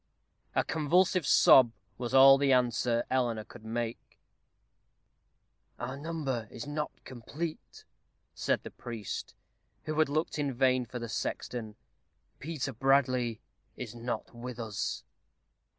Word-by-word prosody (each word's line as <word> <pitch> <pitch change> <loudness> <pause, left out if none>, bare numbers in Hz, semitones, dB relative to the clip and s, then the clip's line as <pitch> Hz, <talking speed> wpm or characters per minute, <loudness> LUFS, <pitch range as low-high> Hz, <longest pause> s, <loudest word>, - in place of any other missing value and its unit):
A - - +3
convulsive 165 +2 +2
sob 125 -4 +7 0.3
was 120 -2 -3
all 135 +1 +8
the 140 -1 +3
answer 120 -2 +2
Eleanor 120 -4 +1
could 105 - -14
make. 115 +1 -5 1.6
"Our 125 +2 -4
number 140 -6 -3
is 115 - -7
not 150 +1 -2
complete," 145 +6 -7 0.5
said - - 0
the - - -8
priest, 110 -6 -6 0.5
who 155 0 -3
had 155 - +4
looked 155 +1 -1
in 140 -2 0
vain 130 -1 +2
for 125 - -6
the 120 -1 -5
sexton. 110 -1 -4 0.6
"Peter 145 -3 -4
Bradley 125 -2 +2 0.4
is 120 -4 -6
not 120 +1 -5
with 120 0 -7
us." 110 -3 -3
125 Hz, 120 wpm, -30 LUFS, 120-140 Hz, 1.6 s, all